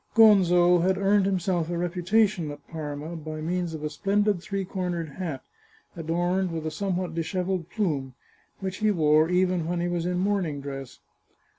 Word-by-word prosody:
Gonzo 180 -5 +6
had 185 +2 +2
earned 195 0 +3
himself 180 -3 0
a 175 - -2
reputation 180 +1 +1
at 145 0 -10
Parma 155 0 -5
by 155 -1 -6
means 170 +1 -2
of 155 - -7
a 150 - -1
splendid 200 +4 +1
three 195 +1 -3
cornered 180 -4 -3
hat, 155 -3 -5 0.5
adorned 175 +3 0
with 160 -1 -4
a 155 - -2
somewhat 180 0 -2
dishevelled 180 +1 -2
plume, 145 - -2 0.5
which 190 -1 -3
he 215 - +2
wore 155 -4 +4
even 180 -2 +1
when 175 0 -1
he 175 - 0
was 175 -1 -1
in 180 0 -1
morning 185 -6 0
dress. 135 -2 -7
175 Hz, 165 wpm, -26 LUFS, 160-190 Hz, 0.5 s, Gonzo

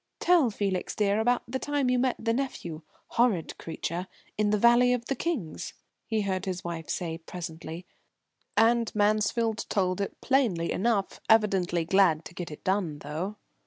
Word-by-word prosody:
"Tell 345 -8 +4
Felix, 200 -3 -2
dear, 205 0 +2
about 245 +2 +2
the 260 +2 -3
time 290 -2 0
you 250 - +2
met 255 0 +2
the 230 0 0
nephew 205 - -3 0.3
horrid 230 -9 +1
creature 170 +2 -4 0.3
in 210 0 +1
the 210 - +3
Valley 240 +3 +5
of 240 -1 -2
the 275 - -1
Kings," 260 - -3 0.3
he 220 -2 0
heard 190 -1 -2
his 185 -1 -3
wife 170 -2 -5
say 165 -2 -3
presently. 165 0 -7 0.7
And 230 0 +4
Mansfield 215 +2 +1
told 185 -1 +1
it 200 - -4
plainly 230 -12 +1
enough, 205 -1 0
evidently 190 -6 +3
glad 170 -3 +3
to - - -9
get 175 -1 -5
it 150 - -10
done, 185 -6 0
though. 160 +8 -4
200 Hz, 160 wpm, -28 LUFS, 175-235 Hz, 0.7 s, Valley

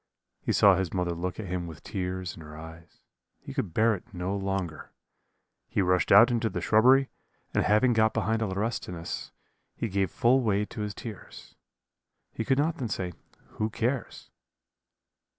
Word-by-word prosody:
He - - -1
saw 100 -1 +6
his 95 -2 -1
mother 90 -2 0
look 90 +3 -4
at 110 - -4
him 90 -1 -3
with 80 -3 -10
tears 90 -1 -4
in - - -11
her 75 0 -10
eyes. 80 +1 -12 0.4
He 140 -1 -9
could 130 - -2
bear 110 +6 +3
it 95 - -8
no 90 +3 -2
longer 95 -4 -3 0.8
he - - -2
rushed 90 0 +2
out 115 +5 +8
into 115 -1 +1
the - - -3
shrubbery, 130 +5 +4 0.4
and - - +2
having 115 +4 +4
got 110 -1 +3
behind 110 0 0
a 110 - +1
laurestinus, 95 -4 -3 0.5
he - - -2
gave 95 -1 0
full 125 +8 +3
way 105 -3 +1
to 105 - -7
his 105 -1 -4
tears 110 -5 -10 0.8
he 115 - -3
could 135 +2 +1
not 160 +3 +1
then 125 - -3
say, 90 -3 -3 0.5
'Who 110 - +1
cares?' 120 +4 -3
100 Hz, 170 wpm, -28 LUFS, 90-115 Hz, 0.8 s, out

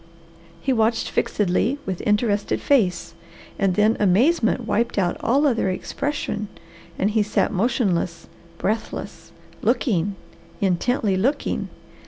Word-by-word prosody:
He 265 - +1
watched 225 0 +1
fixedly 210 +7 +1
with 190 -2 -3
interested 210 -1 +1
face, 180 - +1 0.5
and 190 -2 +2
then 215 +2 +3
amazement 225 - +3
wiped 235 +1 0
out 180 -3 +1
all 275 +6 +2
other 230 -8 +2
expression 215 +2 -3 0.5
and 200 +3 +1
he 220 0 +2
sat 210 +1 0
motionless, 185 -6 0 0.3
breathless, 220 +3 -4 0.3
looking, 200 - +1 0.4
intently 200 +2 +1
looking. 270 +9 -1
210 Hz, 110 wpm, -23 LUFS, 190-240 Hz, 0.5 s, then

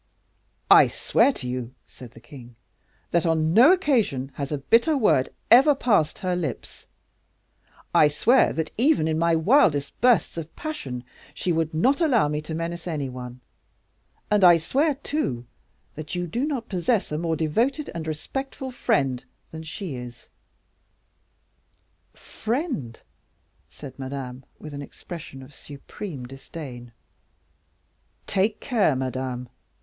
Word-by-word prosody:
"I - - +9
swear - - +2
to 125 - -6
you," 125 0 -5
said 120 -2 -13
the 115 - -14
king, 120 -2 -13 0.6
"that 170 -1 +2
on 160 0 +1
no 245 - +8
occasion 230 - +1
has 140 +1 -5
a 150 - -1
bitter 235 - +3
word 170 - +3 0.2
ever 275 +5 +7
passed 205 - +1
her 185 -3 -1
lips; 155 -9 -5 1.1
I 150 - +6
swear 210 - +3
that, 160 -1 -3
even 270 - +3
in 160 0 0
my 170 0 +3
wildest 160 - +2
bursts 245 -8 +3
of 165 -1 -7
passion, 135 - -5 0.3
she 180 - -1
would 160 -1 0
not 265 - +2
allow 250 - +3
me 150 0 -2
to 155 +1 -6
menace 170 +1 -4
any 150 -5 -3
one; 125 0 -9 0.9
and 210 -2 +3
I 175 -2 +8
swear, 275 - +1
too, 260 - -3 0.5
that 155 +3 -6
you 175 0 -2
do 240 - -2
not 260 -7 -3
possess 190 +2 0
a 150 - -1
more 165 -1 -1
devoted 235 - 0
and 165 -2 -5
respectful 265 - -5
friend 135 - 0 0.3
than 160 - -7
she 165 +1 -6
is." 120 -1 -10 1.9
"Friend!" 225 - -4 0.7
said 140 -2 -11
Madame, 130 -1 -6
with 155 -1 -10
an 140 - -6
expression 140 -1 -9
of 135 +3 -15
supreme 140 +1 -9
disdain. 130 -2 -9 1.3
"Take 205 +2 0
care, 215 - +1
Madame!" 130 -1 -3
160 Hz, 135 wpm, -24 LUFS, 135-225 Hz, 1.9 s, I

